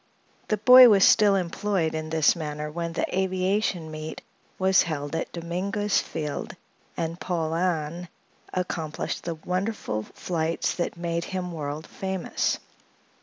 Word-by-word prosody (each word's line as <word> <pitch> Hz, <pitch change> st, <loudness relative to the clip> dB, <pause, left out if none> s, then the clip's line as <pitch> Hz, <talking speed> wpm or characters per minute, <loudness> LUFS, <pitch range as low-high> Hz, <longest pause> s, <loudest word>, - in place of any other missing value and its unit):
The 215 Hz, -, +1 dB
boy 250 Hz, +4 st, +9 dB
was 200 Hz, -3 st, +6 dB
still 205 Hz, -2 st, +5 dB
employed 185 Hz, -1 st, -1 dB
in 155 Hz, 0 st, -4 dB
this 160 Hz, 0 st, +3 dB
manner 150 Hz, -2 st, -4 dB
when 170 Hz, +1 st, -4 dB
the -, -, 0 dB
Aviation 185 Hz, -2 st, 0 dB
Meet 155 Hz, 0 st, -7 dB, 0.3 s
was 190 Hz, 0 st, +4 dB
held 150 Hz, -2 st, -3 dB
at 165 Hz, -, -3 dB
Dominguez 195 Hz, +5 st, -1 dB
Field 150 Hz, -3 st, -5 dB, 0.4 s
and 165 Hz, +1 st, -3 dB
Paulhan 170 Hz, -1 st, -1 dB, 0.4 s
accomplished 165 Hz, -4 st, -3 dB
the 170 Hz, -1 st, -2 dB
wonderful 180 Hz, -, -2 dB
flights 165 Hz, +7 st, -2 dB
that 175 Hz, 0 st, -3 dB
made 170 Hz, 0 st, -2 dB
him 185 Hz, -2 st, -4 dB
world 150 Hz, -1 st, -5 dB
famous. 190 Hz, -2 st, -2 dB
170 Hz, 125 wpm, -26 LUFS, 160-190 Hz, 0.4 s, boy